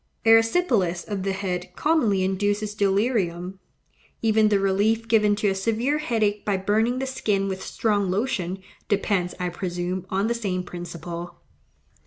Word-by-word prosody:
Erysipelas 225 - +3
of 205 -3 -3
the 195 +1 -1
head 185 -2 -4
commonly 235 -12 +2
induces 205 +2 0
delirium. 195 -3 0 0.6
Even 220 -1 +4
the 205 - +3
relief 205 +4 +1
given 210 -2 +4
to 205 0 0
a - - +1
severe 230 +9 0
headache 215 -7 0
by 205 -2 0
burning 220 +6 +1
the 265 - -2
skin 205 -7 -1
with 190 -1 -4
strong 205 -3 0
lotion, 190 -3 -1 0.3
depends, 195 -3 0
I 180 0 -1
presume, 180 +1 -4
on 195 +2 0
the 235 - +1
same 195 -6 -2
principle. 175 -1 -7
200 Hz, 145 wpm, -24 LUFS, 185-220 Hz, 0.6 s, Even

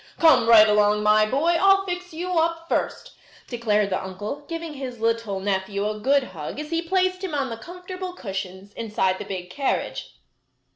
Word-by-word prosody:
"Come 275 -9 +5
right 220 -2 +9
along, 210 0 +3
my 215 0 +4
boy. 325 +8 +2
I'll 390 0 +5
fix 360 -1 -5
you 350 +2 -1
up 330 0 -1
first," - - -2 0.3
declared 210 -4 0
the 185 - -1
uncle, 205 +10 -6
giving 330 -1 -5
his 260 -4 -7
little 225 -3 -1
nephew 200 +1 -1
a 215 0 -4
good 275 +5 +3
hug 170 - -7
as 300 +1 -6
he 330 0 +1
placed 370 +2 0
him 355 -6 -3
on 270 -3 -1
the 230 - -5
comfortable 360 +6 -7
cushions 195 - -6
inside 200 -4 -1
the - - -6
big 180 -2 -6
carriage. 275 +6 -2
240 Hz, 180 wpm, -24 LUFS, 205-335 Hz, 0.3 s, right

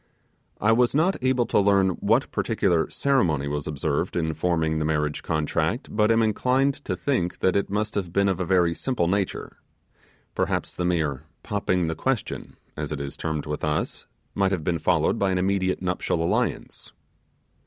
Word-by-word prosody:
I 105 - +3
was 120 +3 +3
not 175 +6 +3
able 130 -1 +2
to - - +2
learn 100 -1 +4
what 90 - +1
particular 85 -4 +1
ceremony 85 - +1
was 75 0 -3
observed 75 +3 -2
in 80 -2 0
forming 80 -1 0
the - - 0
marriage 75 -1 -1
contract, 80 - -1
but 105 0 +3
am 115 0 +4
inclined 130 +6 +2
to - - -1
think 105 -11 -1
that 95 - +1
it 100 - +1
must 105 +1 -1
have 95 -4 -2
been 100 +3 +2
of 95 -2 0
a - - 0
very 90 -2 +2
simple 105 -2 -1
nature. 100 +1 -2 0.8
Perhaps - - -1
the 90 - -3
mere 80 -7 0 0.2
'popping 95 -4 0
the 80 - -1
question', 130 +8 -3 0.2
as 75 -1 -4
it 75 - -3
is 70 -1 -5
termed 80 -2 -3
with 75 0 -4
us, 75 0 -2 0.3
might 95 -1 +1
have 90 -5 -1
been 85 0 0
followed 80 +5 +1
by 100 - +2
an 95 - +1
immediate 95 0 0
nuptial 90 -2 -1
alliance. 85 - -2
90 Hz, 175 wpm, -25 LUFS, 80-105 Hz, 0.8 s, learn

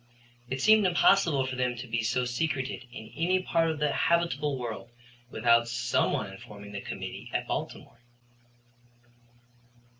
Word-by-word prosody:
It 130 0 -3
seemed 215 -2 +6
impossible 170 -5 +4
for 130 0 -4
them 125 -1 0
to 120 +2 -7
be 115 -1 -1
so 125 +3 0
secreted 130 -1 -2
in 110 -2 -10
any 180 +4 +2
part 165 -2 +2
of 160 - -2
the 150 -1 +1
habitable 150 -5 +1
world 120 -1 -6 0.4
without 115 -1 +3
some 120 0 +1
one 95 - -2
informing 100 -1 -11
the 100 -1 -5
committee - - -7
at - - -2
Baltimore. - - -5
125 Hz, 145 wpm, -28 LUFS, 115-160 Hz, 0.4 s, seemed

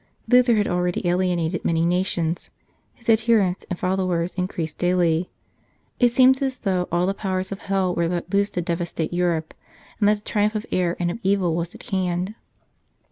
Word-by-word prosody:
Luther 245 -1 +5
had 210 -1 +1
already 180 0 -1
alienated 175 -1 0
many 165 0 +1
nations, 175 -1 0 0.5
his 230 - -16
adherents 220 -5 +2
and 180 - -3
followers 185 -2 -1
in 180 0 -1
creased 160 -4 -5
daily; 175 -1 +1 0.7
it 245 - +5
seemed 260 +2 +5
as 265 -2 -1
though 185 -6 -1
all 175 +1 +2
the 195 - 0
powers 190 -1 -3
of 195 - -5
hell 195 -2 0
were 170 -1 0
let 175 +2 -4
loose 200 +1 +3
to 175 - -3
devastate 170 -1 -3
Europe, 170 -3 0 0.5
and 205 -2 +4
that 210 - +4
the 205 - -12
triumph 210 0 0
of 215 +1 -2
error 175 -1 0
and 175 -1 0
of 205 - -6
evil 190 -4 +1
was 170 0 -3
at - - -12
hand. 185 +1 -1
180 Hz, 185 wpm, -23 LUFS, 175-200 Hz, 0.7 s, Luther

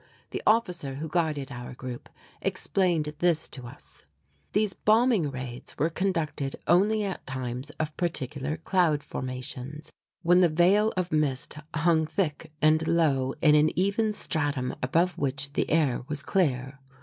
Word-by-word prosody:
The - - -3
officer 180 -11 +2
who 155 +4 -4
guided 155 -5 -1
our 125 -1 -7
group 125 -1 -7 0.3
explained 170 -6 0
this 170 -3 +2
to 125 -3 -8
us: - - -11 0.5
these 210 -2 +1
bombing 220 - +3
raids 130 -2 -6
were 160 +4 +1
conducted 165 -7 -1
only 210 +4 +3
at 195 -2 -5
times 130 +1 -4
of 155 -1 -2
particular 150 -3 -2
cloud 165 -3 +1
formations, 130 +3 -6 0.3
when 175 +2 +5
the 175 - +5
veil 190 +7 +4
of 185 -1 -1
mist 145 -4 0 0.2
hung 160 -1 +3
thick 155 -4 -2
and 155 +1 +4
low 135 -6 +2
in 150 -2 +7
an 150 +1 +5
even 200 +4 +2
stratum 145 -9 -1
above 170 +6 +1
which 140 0 -2
the - - 0
air 150 -6 +2
was 145 -1 -4
clear. 135 -7 0
155 Hz, 145 wpm, -27 LUFS, 135-175 Hz, 0.5 s, in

